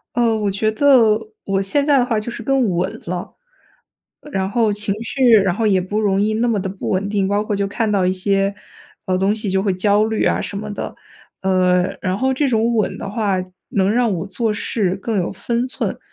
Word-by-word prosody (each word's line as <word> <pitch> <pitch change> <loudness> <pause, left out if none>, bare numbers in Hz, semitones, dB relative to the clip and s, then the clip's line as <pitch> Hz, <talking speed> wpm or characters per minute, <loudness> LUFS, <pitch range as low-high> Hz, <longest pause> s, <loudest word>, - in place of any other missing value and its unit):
呃， 235 -2 +2
我 210 -1 0
觉 200 +3 0
得 230 -3 +4 0.2
我 195 -1 -1
现 240 +9 +1
在 285 -1 +4
的 245 - +2
话 225 -3 0
就 215 - -5
是 235 - -7
更 265 -4 +2
稳 180 +1 -2
了。 175 +1 -5 1.0
然 190 0 -1
后 225 0 +1
情 205 -1 -1
绪 255 +2 +1
然 195 -4 +4
后 225 +2 0
也 195 -3 +3
不 205 +4 -2
容 200 -2 +2
易 215 +1 +1
那 230 +2 +1
么 225 -3 +1
的 190 - -3
不 195 - -6
稳 195 +1 0
定， 200 -2 0
包 205 +1 +1
括 210 - -2
就 200 0 0
看 215 +2 -1
到 195 -3 +2
一 185 - +2
些 195 +1 0 0.5
呃 185 -1 +1
东 195 +2 +2
西 215 -2 -2
就 190 0 +1
会 195 -3 0
焦 205 +3 +2
虑 220 -1 -1
啊 - - +1
什 200 - -5
么 210 +1 -5
的。 - - -5 0.5
呃， 185 -1 +2 0.2
然 185 -1 -1
后 265 +5 +1
这 275 +2 +1
种 230 -1 +1
稳 215 - 0
的 195 - -6
话 210 -2 0 0.4
能 195 -1 +1
让 240 0 +2
我 165 - -3
做 225 +2 -1
事 205 -3 -1
更 215 +3 -3
有 180 - -1
分 235 +5 -2
寸， 255 - -3
205 Hz, 240 characters per minute, -19 LUFS, 195-225 Hz, 1.0 s, 得